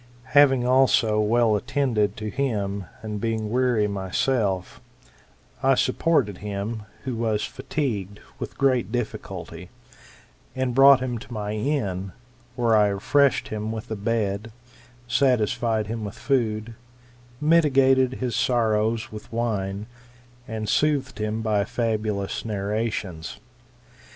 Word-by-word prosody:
Having 135 -3 +5
also 125 -4 +4
well 110 +1 +3
attended 105 -3 0
to 110 -1 -4
him, 100 -8 -2 0.2
and 105 -2 -4
being 110 -2 -2
weary 120 -4 +2
myself, 95 0 -1 0.8
I 135 0 +4
supported 130 - +1
him, 105 +2 -4 0.2
who 130 -3 -3
was 110 -2 0
fatigued, 105 - -3 0.2
with - - -6
great 130 -5 +2
difficulty, 90 -7 -5 0.9
and 130 -1 -1
brought 135 0 +7
him 125 -2 -2
to - - -13
my 105 -2 -3
inn; 105 -7 -2 0.4
where 120 -2 +2
I 105 -1 +5
refreshed 135 +8 +2
him 110 0 -3
with 110 +1 -6
a - - -1
bed, 105 0 -2 0.6
satisfied 115 -3 +1
him 110 +1 -4
with 100 -1 -6
food, 115 -4 -1 0.7
mitigated 135 -5 +4
his 125 -4 -3
sorrows 110 -2 +1
with 105 -1 -10
wine, 105 -4 -2 0.6
and 110 -1 -4
soothed 140 +2 +1
him 110 +1 -2
by 105 -2 +2
fabulous 110 -4 -2
narrations. 105 -5 -3
110 Hz, 115 wpm, -24 LUFS, 105-125 Hz, 0.9 s, brought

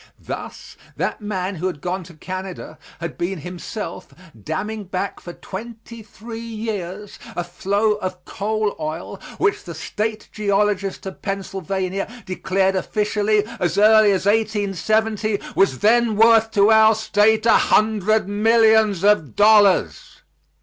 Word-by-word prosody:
Thus - - -8 0.2
that - - -2
man 195 -2 -3
who 180 +4 -2
had 175 -5 -5
gone 180 +4 -3
to 170 -1 -14
Canada 185 +3 -7 0.2
had 170 0 -6
been 175 -1 -3
himself 180 +5 -7 0.3
damming 210 - -4
back 190 +2 -4
for 175 - -9
twenty 230 +4 -9
three 225 +2 -10
years 210 -4 -6 0.2
a 175 - -2
flow 200 +5 0
of 185 -3 -6
coal 215 0 -2
oil 155 +2 -5 0.2
which 415 -1 0
the - - -8
State 215 0 -4
Geologist 200 -2 -1
of 190 - -8
Pennsylvania 195 0 -3
declared 190 +1 0
officially, 210 +1 0
as 175 0 -1
early 215 0 +6
as 190 -1 -1
1870, 215 0 0 0.2
was 195 -9 +3
then 230 - +3
worth 225 +1 +5
to 210 -1 +4
our 220 0 +6
State 220 0 +2
a 230 - +6 0.2
hundred 215 -1 +2
millions 220 -2 +3
of 200 - +2
dollars. 205 - +3
205 Hz, 130 wpm, -21 LUFS, 185-220 Hz, 0.3 s, early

